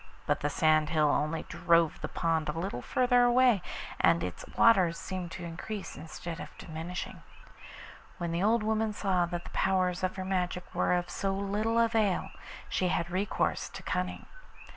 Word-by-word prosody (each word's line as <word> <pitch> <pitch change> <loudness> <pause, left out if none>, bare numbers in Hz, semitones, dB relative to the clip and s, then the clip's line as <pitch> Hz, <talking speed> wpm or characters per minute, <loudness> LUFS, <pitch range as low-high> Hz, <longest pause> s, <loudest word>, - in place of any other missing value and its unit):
But - - +1
the 145 - -1
sand 155 0 +3
hill 155 -3 +3
only 155 +3 0
drove 170 -1 +2
the - - -2
pond 165 -2 0
a - - 0
little 170 -7 -3
farther 245 - +3
away, 245 -4 +4 0.4
and 85 0 +4
its 90 -1 -5
waters 185 -7 +5
seemed 185 -2 -5
to 180 - -7
increase 185 +5 -6
instead 165 +2 -7
of - - -9
diminishing. 165 +2 -6 1.0
When 170 -2 -3
the 170 +1 -1
old 220 +2 +3
woman 220 0 0
saw 185 -4 +1
that 175 0 -4
the - - -11
powers 185 -1 +1
of 185 - 0
her 190 -1 -4
magic 180 -1 -2
were - - +2
of 175 0 -2
so 195 -1 -1
little 205 +3 0
avail, 225 -4 +2 0.4
she 185 - 0
had 175 -1 -1
recourse 190 +3 -1
to - - -9
cunning. - - -2
180 Hz, 170 wpm, -30 LUFS, 165-205 Hz, 1.0 s, waters